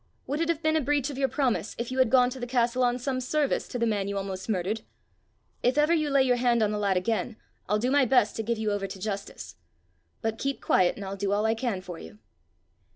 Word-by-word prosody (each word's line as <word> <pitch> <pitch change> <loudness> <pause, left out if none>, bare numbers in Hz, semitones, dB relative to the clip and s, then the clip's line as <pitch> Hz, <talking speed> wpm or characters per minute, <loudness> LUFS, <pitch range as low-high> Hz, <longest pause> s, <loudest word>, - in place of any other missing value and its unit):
Would 290 +4 -2
it 330 - 0
have 330 -1 -1
been 315 0 +2
a 315 - +3
breach 290 0 0
of 275 - -7
your 270 - +3
promise 260 -5 -1
if 235 +1 -4
you 260 - -2
had 260 -3 +4
gone 250 0 +4
to 260 - -7
the 245 - -4
castle 245 0 +1
on 245 0 +2
some 255 0 -2
service 285 +2 0
to - - -5
the 235 - +1
man 205 -3 0
you 200 0 -3
almost 195 +1 -5
murdered? 205 +2 -1 0.8
If 250 +4 +1
ever 300 +3 +4
you 305 -3 +1
lay 275 -1 +4
your 250 -1 +2
hand 240 -2 +2
on 210 - +1
the 210 - -2
lad 200 -2 +1
again, 220 +4 -1 0.3
I'll 210 - +3
do 245 +4 0
my 285 -1 +4
best 245 -4 +3
to - - 0
give 230 +1 -1
you 215 -1 -1
over 200 -1 -2
to 195 - -8
justice. 200 - -6 0.7
But 225 0 -2
keep 275 0 -2
quiet, 180 -1 +2
and 200 - -7
I'll 195 +1 -4
do 195 0 -1
all 205 +2 +1
I 220 - +3
can 225 -5 -2
for 180 -2 -8
you." 80 - -11
235 Hz, 260 wpm, -27 LUFS, 205-265 Hz, 0.8 s, had